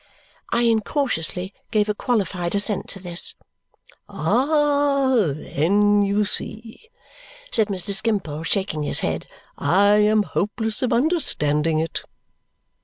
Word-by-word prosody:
I 235 Hz, -, +2 dB
incautiously 220 Hz, -, -1 dB, 0.2 s
gave 215 Hz, -2 st, +1 dB
a 210 Hz, -, 0 dB
qualified 195 Hz, -6 st, -1 dB
assent 205 Hz, 0 st, +1 dB
to 195 Hz, -, -7 dB
this. 175 Hz, -1 st, 0 dB, 0.7 s
"Ah! 285 Hz, -1 st, +1 dB
Then 200 Hz, +8 st, +1 dB
you 200 Hz, +1 st, +1 dB
see," 225 Hz, -, -7 dB, 0.6 s
said 220 Hz, -3 st, +2 dB
Mr. 195 Hz, -1 st, -2 dB
Skimpole, 195 Hz, -8 st, -1 dB
shaking 165 Hz, -2 st, -2 dB
his 145 Hz, -, 0 dB
head, -, -, -3 dB, 0.3 s
"I 200 Hz, +4 st, +4 dB
am 210 Hz, 0 st, +3 dB
hopeless 215 Hz, +4 st, -1 dB
of 255 Hz, -1 st, 0 dB
understanding 165 Hz, -, +1 dB
it." 160 Hz, 0 st, -2 dB
205 Hz, 110 wpm, -22 LUFS, 180-235 Hz, 0.7 s, I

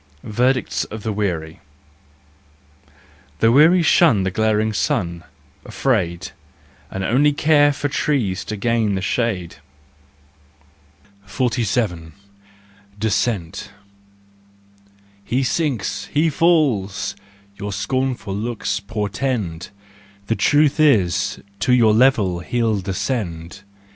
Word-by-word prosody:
Verdicts 125 Hz, +4 st, 0 dB
of 110 Hz, -1 st, -9 dB
the 110 Hz, -, -2 dB
Weary. 85 Hz, -6 st, -3 dB, 1.8 s
The 115 Hz, +6 st, +3 dB
weary 160 Hz, +7 st, +5 dB
shun 155 Hz, -, +4 dB
the 95 Hz, -, -1 dB
glaring 110 Hz, +1 st, +1 dB
sun, 85 Hz, -5 st, -1 dB, 0.4 s
afraid, 90 Hz, -10 st, -1 dB, 0.6 s
And 95 Hz, -, -5 dB
only 145 Hz, +8 st, +3 dB
care 145 Hz, 0 st, +4 dB
for 145 Hz, 0 st, -2 dB
trees 130 Hz, -10 st, -1 dB
to 105 Hz, -, -5 dB
gain 110 Hz, -1 st, 0 dB
the 95 Hz, -, -2 dB
shade. 95 Hz, -, -2 dB, 1.7 s
47 110 Hz, -8 st, -1 dB, 0.8 s
Descent. 105 Hz, -3 st, -2 dB, 0.8 s
" -, -, -32 dB, 0.7 s
He 125 Hz, +6 st, -1 dB
sinks, 140 Hz, -3 st, -1 dB
he 155 Hz, +2 st, +1 dB
falls," 140 Hz, -, +1 dB, 0.4 s
your 105 Hz, 0 st, -5 dB
scornful 120 Hz, +1 st, -2 dB
looks 105 Hz, -2 st, -2 dB
portend: 105 Hz, -4 st, -3 dB, 0.6 s
The 115 Hz, -, 0 dB
truth 150 Hz, +3 st, +2 dB
is, 105 Hz, -, +2 dB, 0.2 s
to 125 Hz, +4 st, +2 dB
your 115 Hz, -4 st, +5 dB
level 110 Hz, -7 st, +3 dB
he'll 110 Hz, +2 st, -1 dB
descend. 95 Hz, -3 st, -4 dB
110 Hz, 100 wpm, -20 LUFS, 95-130 Hz, 1.8 s, weary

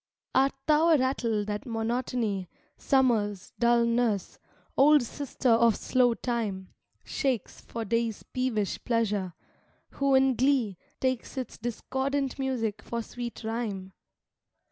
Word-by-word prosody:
Art 270 Hz, +1 st, +3 dB
thou 310 Hz, +2 st, +4 dB
a 320 Hz, -, +6 dB
rattle 235 Hz, -5 st, 0 dB
that 210 Hz, +6 st, -4 dB
Monotony, 225 Hz, -4 st, -1 dB, 0.3 s
Summer's 220 Hz, -8 st, +1 dB
dull 235 Hz, 0 st, +4 dB
nurse, 230 Hz, -4 st, 0 dB, 0.4 s
old 295 Hz, 0 st, +6 dB
sister 260 Hz, +1 st, -2 dB
of 230 Hz, -1 st, +5 dB
slow 245 Hz, -2 st, +2 dB
Time, 215 Hz, -7 st, -3 dB, 0.3 s
Shakes 260 Hz, -7 st, -2 dB
for 230 Hz, -1 st, -5 dB
Day's 230 Hz, 0 st, -1 dB
peevish 240 Hz, -6 st, -2 dB
pleasure, 210 Hz, -7 st, 0 dB, 0.6 s
who 275 Hz, -1 st, +2 dB
in 265 Hz, 0 st, +5 dB
glee 245 Hz, -6 st, +1 dB, 0.2 s
Takes 260 Hz, +1 st, -2 dB
its 255 Hz, -3 st, -5 dB
discordant 265 Hz, +4 st, -2 dB
music 245 Hz, -6 st, -1 dB
for 235 Hz, -1 st, -4 dB
sweet 240 Hz, 0 st, -7 dB
rhyme? 215 Hz, -4 st, -3 dB
235 Hz, 120 wpm, -28 LUFS, 220-265 Hz, 0.6 s, a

